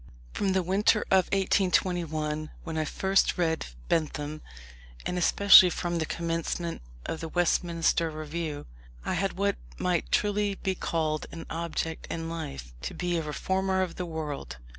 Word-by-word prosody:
From 195 -2 0
the 190 -1 +2
winter 200 +4 +3
of 190 -2 +5
1821, 175 -5 +1
when 165 -1 -5
I 155 0 0
first 190 +5 +2
read 160 -2 0 0.2
Bentham, 155 -1 -1 0.6
and 180 - -1
especially 185 +1 +8
from 175 -1 -2
the 160 - -1
commencement 170 0 -2 0.2
of 160 - -3
the 165 - -5
Westminster 170 -1 +2
Review, 155 - -4 0.4
I - - 0
had 195 +2 0
what 200 +1 0 0.2
might 180 -2 0
truly 205 -1 +1
be 190 0 -1
called 155 -4 -1
an 165 - -7
object 165 -1 -3
in 165 0 -3
life; 70 - -6
to - - -5
be 175 -1 -1
a - - -1
reformer 190 +5 0
of 180 - -5
the 180 - -3
world. 150 - -5
170 Hz, 150 wpm, -28 LUFS, 160-185 Hz, 0.6 s, especially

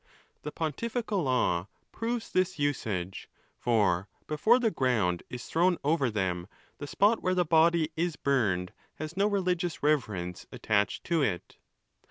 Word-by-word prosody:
'The 150 - -5
pontifical 210 - -2
law 115 - +1 0.2
proves 230 0 -3
this 185 0 +1
usage, 110 - -2 0.3
for 100 -6 +2 0.2
before 185 +11 +3
the 235 -3 +1
ground 110 - +1
is 125 0 -7
thrown 175 +2 +2
over 145 -3 +2
them, 95 -4 -2 0.3
the 145 - -5
spot 210 +8 +3
where 185 0 +1
the 180 -1 +2
body 165 0 +3
is 170 -1 -1
burned 100 -12 0 0.2
has 155 +2 -6
no 200 +2 +3
religious 180 -5 -1
reverence 105 - -1
attached 105 -1 0
to 170 -3 +1
it. 95 -10 -2
150 Hz, 140 wpm, -29 LUFS, -, 0.3 s, before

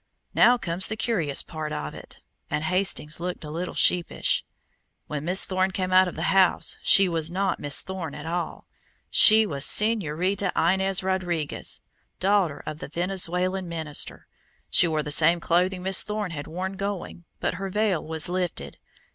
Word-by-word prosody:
"Now 245 +1 +5
comes 175 -3 -1
the 215 - -4
curious 170 - +1
part 155 -2 -6
of 75 - -5
it," - - -11 0.3
and 150 - -2
Hastings 180 -3 -1
looked 180 0 -5
a 150 - -8
little 175 +3 -5
sheepish. 175 -1 +1 0.6
"When 150 -1 -5
Miss 180 +3 +5
Thorne 185 0 0
came 185 -1 -3
out 185 0 +5
of 180 - -6
the 160 - -4
house 190 -2 +3
she 195 -1 +5
was 165 -2 -2
not 190 +2 -1
Miss 145 -2 -1
Thorne 185 -5 -6
at 150 - -8
all 170 +1 -4 0.5
she 220 +1 +7
was 140 -8 -3
Señorita 195 -2 +1
Inez 190 +2 +1
Rodriguez, 175 -5 -3 0.4
daughter 190 -5 +1
of 155 - -6
the - - -7
Venezuelan 180 +2 -1
minister. 160 -3 -3 0.5
She 175 - +5
wore 155 -2 -1
the 150 - -5
same 165 +3 +4
clothing 180 +2 0
Miss 190 0 +7
Thorne 210 -3 -4
had 145 -3 -7
worn 190 +4 -5
going, 195 -3 -5
but - - -1
her 195 - -3
veil 210 -3 0
was 160 -1 -2
lifted. 180 -1 -4
180 Hz, 165 wpm, -25 LUFS, 160-190 Hz, 0.6 s, she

